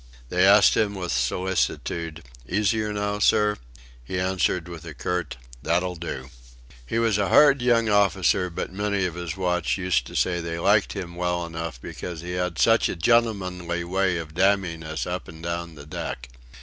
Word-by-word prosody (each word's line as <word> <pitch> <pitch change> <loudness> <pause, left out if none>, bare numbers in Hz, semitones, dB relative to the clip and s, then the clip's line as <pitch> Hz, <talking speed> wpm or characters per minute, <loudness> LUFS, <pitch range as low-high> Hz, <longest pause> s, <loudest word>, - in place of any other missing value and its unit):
They 90 +2 +4
asked 100 0 +6
him 105 -2 +1
with 90 -4 -4
solicitude: 85 +3 -1 0.3
"Easier 105 +2 +1
now, 105 0 -2
sir?" 105 0 +3 0.5
He 90 +9 -3
answered 90 -1 0
with 85 -3 -9
a - - -9
curt: 90 -5 -3 0.2
"That'll 90 +4 0
do." 70 -6 -6 0.6
He 115 - -2
was 115 -3 +2
a 100 - +1
hard 140 -3 +6
young 120 -2 +3
officer, 100 -2 +2
but 85 - -5
many 100 -1 0
of 90 - -2
his 85 +1 -5
watch 90 -2 0
used 90 -11 0
to - - -10
say 90 -1 +1
they 85 0 -4
liked 100 +4 +3
him 90 -4 -6
well 90 -1 -1
enough 80 -5 -6
because 85 +5 -7
he 90 +1 -6
had 90 -2 -2
"such 115 0 +4
a - - -3
gentlemanly 90 -4 +1
way 95 0 0
of 80 -2 -7
damning 95 -2 +1
us 80 -4 -4
up - - -4
and 80 +1 -11
down 85 -1 -4
the 70 -1 -11
deck." - - -6
90 Hz, 175 wpm, -25 LUFS, 85-100 Hz, 0.6 s, asked